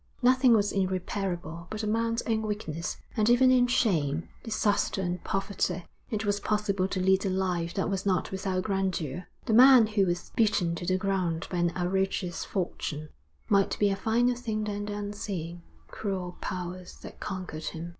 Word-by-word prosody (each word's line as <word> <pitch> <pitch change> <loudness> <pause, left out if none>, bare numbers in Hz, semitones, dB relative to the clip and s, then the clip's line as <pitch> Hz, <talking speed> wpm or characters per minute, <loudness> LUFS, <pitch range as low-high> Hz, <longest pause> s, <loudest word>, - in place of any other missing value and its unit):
Nothing 255 0 +5
was 205 -1 +2
irreparable 185 -2 -2
but 215 0 -4
a - - -1
man's 230 +2 0
own 220 -1 0
weakness, 205 -7 -3 0.2
and 215 0 +2
even 255 +2 +6
in 250 -1 +5
shame, 165 - +1
disaster, 215 -3 0
and 180 -1 -2
poverty, 195 -2 -1 0.2
it 215 -1 -2
was 205 0 +1
possible 205 -3 0
to 190 - -3
lead 190 +1 +3
a 195 - 0
life 180 -3 -1
that 195 - 0
was 195 -2 -1
not 185 -4 0
without 190 -1 -1
grandeur. 185 -5 -2 0.2
The 225 - 0
man 255 0 +9
who 210 -3 +1
was 175 0 -2
beaten 205 -6 +2
to 170 +1 -5
the 185 0 +2
ground 185 -4 -1
by 180 - -1
an 175 0 +2
outrageous 185 0 -1
fortune 155 -5 -3 0.4
might 200 -1 +2
be 205 -1 +3
a - - +1
finer 235 +5 +2
thing 225 -3 -3
than 205 -1 -3
the 205 - -4
unseeing, 195 -5 -5 0.3
cruel 185 -4 -4
powers 180 0 -5
that - - -10
conquered 180 -5 -5
him. 165 +1 -5
195 Hz, 175 wpm, -28 LUFS, 180-215 Hz, 0.4 s, man